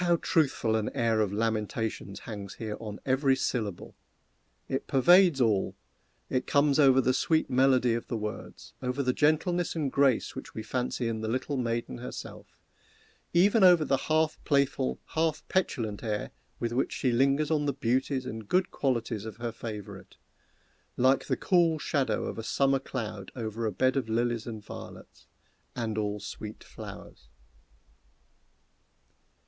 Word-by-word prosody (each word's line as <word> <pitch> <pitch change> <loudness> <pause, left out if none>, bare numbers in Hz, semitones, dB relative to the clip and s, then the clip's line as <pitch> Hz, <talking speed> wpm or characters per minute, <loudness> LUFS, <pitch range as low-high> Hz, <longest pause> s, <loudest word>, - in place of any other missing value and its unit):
How 175 -1 +4
truthful 140 -9 +1
an 110 -1 0
air 115 -4 +2
of 105 -3 0
lamentations 110 -1 -2
hangs 100 -4 -7
here 110 -2 -5
upon 105 -1 -7
every 135 0 +3
syllable! 110 -8 -3 0.7
It 135 - -3
pervades 175 +3 +5
all. 110 -6 +2 0.5
It 130 -1 -1
comes 140 0 +3
over 135 -2 +6
the 130 0 +3
sweet 160 +2 +1
melody 130 -2 +4
of 115 - -3
the 115 - -2
words 105 0 -7
over 130 +2 -1
the 125 -1 +1
gentleness 165 +5 +1
and 150 -5 -1
grace 135 -4 +2
which - - -8
we 110 - -4
fancy 125 0 -2
in 110 -1 -2
the 110 - -3
little 130 +5 -2
maiden 115 - -2
herself - - -9 0.7
even 200 +5 +4
over 175 -4 +7
the 135 - +2
half 155 0 +1
playful, 140 - +1
half 160 -1 -1
petulant 115 - -1
air 105 -2 -2 0.3
with 115 0 -2
which 130 - 0
she 130 - 0
lingers 140 +5 +2
on 150 -2 +1
the - - +2
beauties 130 +1 0
and 110 -3 -7
good 185 +1 +2
qualities 115 -5 -1
of 110 -1 -8
her 120 0 -3
favorite 110 -3 -8 0.8
like 130 +2 +3
the - - 0
cool 170 -3 +3
shadow 135 -7 0
of - - -5
a - - -4
summer 135 +4 +2
cloud 110 -7 -5
over 115 -1 -3
a - - -1
bed 130 +7 +1
of 130 -5 -1
lilies 120 0 0
and 110 -3 -7
violets, - - -11 0.5
"and 115 -3 -2
all 105 -1 -2
sweet 105 +1 -8
flowers." - - -11
125 Hz, 155 wpm, -29 LUFS, 110-140 Hz, 0.8 s, over